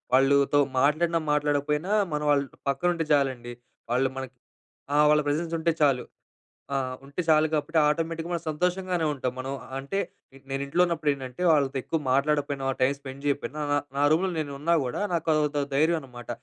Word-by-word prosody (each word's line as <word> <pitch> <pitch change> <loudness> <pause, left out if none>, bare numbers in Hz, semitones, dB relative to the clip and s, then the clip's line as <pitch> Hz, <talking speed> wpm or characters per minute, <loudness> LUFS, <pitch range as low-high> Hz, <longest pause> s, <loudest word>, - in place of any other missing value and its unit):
వాళ్ళతో 140 +2 +4 0.2
మాట్లాడినా, 160 +4 +2
మాట్లాడకపోయినా, 150 +4 0 0.2
మన 150 - -2
వాళ్ళు 140 -1 +2 0.2
పక్కన 175 +6 +1
ఉంటే 165 -2 -2
చాలండి. 130 -4 0 0.4
వాళ్ళు 130 +2 +2
మనకి, 130 -1 -6 0.6
ఆ! - - +2 0.2
వాళ్ళ 150 0 +4
ప్రెజెన్స్ 165 +3 -1
ఉంటే 165 +1 +2
చాలు. 135 -4 +3 0.7
ఆ! - - +2 0.3
ఉంటే 140 +6 -4
చాలు 155 0 +5
కాబట్టి, 155 +2 +1
ఆటోమేటిక్‌గా 165 +2 -1
మనం 170 -1 -3
సంతోషంగానే 180 +1 0
ఉంటాం. 130 -2 -2
మనం 130 +1 -4 0.3
అంటే, 140 +8 -4 0.5
నేను 135 0 -2
ఇంట్లో 170 +6 +1
ఉన్నప్పుడు 160 -3 -1
ఏంటంటే 130 +2 -8
వాళ్ళతో 140 -3 +2
ఎక్కువ 160 - -1
మాట్లాడకపోయినా, 140 0 +1
టైమ్ 135 +2 +3
స్పెండ్ 135 0 -9
చేయకపోయినా, 145 +1 -2
నా 145 - +3 0.2
నా 140 - +2
రూమ్‌లో 180 +4 +2
నేను 145 -2 -3
ఉన్నా 170 +3 +1
కూడా 125 - -3
నాకు 165 -2 -1
అదో 155 0 +2
దో 145 - +2
ధైర్యం 160 +4 +3
అనమాట. 120 -3 -12
145 Hz, 170 wpm, -26 LUFS, 135-165 Hz, 0.7 s, చాలు